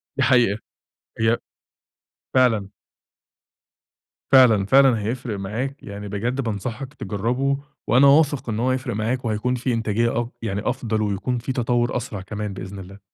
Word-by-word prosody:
دي 140 - +1
حقيقة. 120 -6 +3 0.6
هي 115 +1 +3 1.0
فعلًا. 110 -6 +3 1.6
فعلًا، 115 -7 +6
فعلًا، 130 +1 +5
هيفرق 110 -1 -3
معاك. 120 +9 -4
يعني 100 0 -7
بجد 120 +7 -2
بانصحك 120 +4 -4
تجرَّبه 125 +5 -1 0.3
وأنا 130 +5 +6
واثق 145 -3 +3
إن 110 0 -2
هو 125 +2 +1
هيفرِق 130 -2 -1
معاك 120 +4 -1
وهيكون 115 +3 0
في 125 0 -1
إنتاجية 115 +1 0
أ 120 - -5
يعني 100 -3 -2
أفضل، 115 -4 -1
ويكون 105 +4 -1
في 120 +3 -4
تطوُّر 120 -1 0
أسرع 105 -5 -5
كمان 105 +1 -5
بإذن 95 +1 -7
الله. 95 +2 -11
115 Hz, 140 wpm, -23 LUFS, 105-130 Hz, 1.6 s, فعلًا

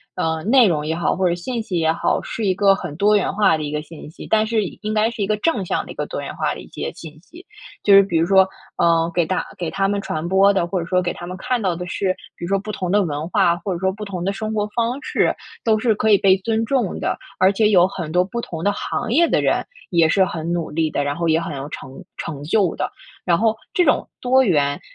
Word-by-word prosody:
呃， 160 -1 -1
内 240 +2 +5
容 150 -4 0
也 160 +1 -1
好， 170 - 0
或 185 -1 +1
者 170 - 0
信 230 +7 -4
息 190 -5 -3
也 160 -1 +2
好， - - 0
是 225 - -5
一 190 - +3
个 200 0 +4
很 175 -6 -7
多 210 +3 +4
元 205 - +1
化 205 -4 +3
的 155 - -4
一 145 - -4
个 150 0 -2
信 155 -1 -11
息， - - -11
但 220 0 +3
是 220 -1 0
应 - - -8
应 215 0 -3
该 215 +1 +3
是 225 - -6
一 - - -1
个 215 0 +1
正 235 -5 0
向 - - -1
的 - - -9
一 - - -10
个 - - -3
多 - - -5
元 - - -7
化 - - -1
的 - - -9
一 - - -11
些 - - -5
信 155 -2 -11
息。 340 - -15 0.4
就 205 - +5
是 195 - +10
比 175 -4 -1
如 165 - +3
说， 190 0 +5 0.3
呃， 165 -1 +3
给 175 -1 +2
大 185 +3 -1
给 175 -4 -3
他 195 0 0
们 200 0 -1
传 155 -3 -4
播 195 +2 +5
的， 190 -3 +1
或 185 +1 -2
者 165 - -4
说 180 -1 +2
给 175 -1 -2
他 175 - -9
们 185 +1 -6
看 250 +3 -1
到 185 -4 0
的 180 +1 -5
是， 185 +1 -1 0.2
比 - - -11
如 - - -5
说 195 - +2
不 215 +2 -6
同 185 -3 -3
的 205 +1 +4
文 155 -1 -4
化， 170 -1 +3
或 180 +3 -5
者 170 - -4
说 190 +1 +1
不 210 +2 -8
同 190 -4 -5
的 195 +2 -1
生 215 +1 -4
活 210 -1 0
方 240 +3 -1
式， - - +1 0.3
都 220 -2 +3
是 225 0 +2
可 220 +1 0
以 205 - +7
被 190 0 +4
尊 225 +3 -1
重 245 -5 -1
的。 - - -1 0.2
而 185 +1 +5
且 210 +1 +3
有 185 -3 +5
很 170 -5 -6
多 180 +2 +3
不 235 +5 -4
同 165 -7 -6
的 205 - +3
行 220 - -3
业 335 +7 +4
的 - - +2
人 - - +1 0.3
也 170 -3 +4
是 190 +3 +4
很 165 -2 -4
努 170 -2 -2
力 160 0 0
的， 145 - -1
然 145 0 -1
后 170 +1 -1
也 160 +1 +3
很 165 -3 -5
有 135 +1 -5
成 135 -3 -9
成 145 -3 -6
就 180 +3 +1
的。 - - -3 0.3
然 170 -2 +3
后， 220 0 +2 0.2
这 360 - +3
种 - - +2
多 260 +1 +3
元， 145 - +1
190 Hz, 305 characters per minute, -21 LUFS, 165-215 Hz, 0.4 s, 是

